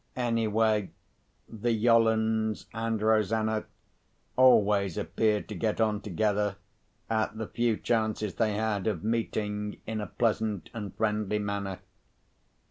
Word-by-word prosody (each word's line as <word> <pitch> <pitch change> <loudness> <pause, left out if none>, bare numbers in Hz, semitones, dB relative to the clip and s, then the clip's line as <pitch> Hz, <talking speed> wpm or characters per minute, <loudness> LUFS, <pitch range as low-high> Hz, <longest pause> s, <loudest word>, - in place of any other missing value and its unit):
Anyway, 110 -4 +1 0.6
the 115 +1 -2
Yollands 110 -1 +2
and 115 0 -1
Rosanna 110 0 +2 0.7
always 105 -7 +4
appeared 105 -2 0
to 105 - -6
get 105 +3 -1
on 110 -2 +1
together, 105 +1 0 0.5
at 110 -1 -1
the 110 - -3
few 115 0 0
chances 110 -3 -1
they 110 -2 0
had 105 -2 -1
of 95 -7 -1
meeting, 105 -2 -2
in 110 -1 -3
a 105 - -4
pleasant 110 -2 -1
and 105 -5 -6
friendly 105 -1 0
manner. 100 -2 -3
110 Hz, 120 wpm, -29 LUFS, 105-110 Hz, 0.7 s, always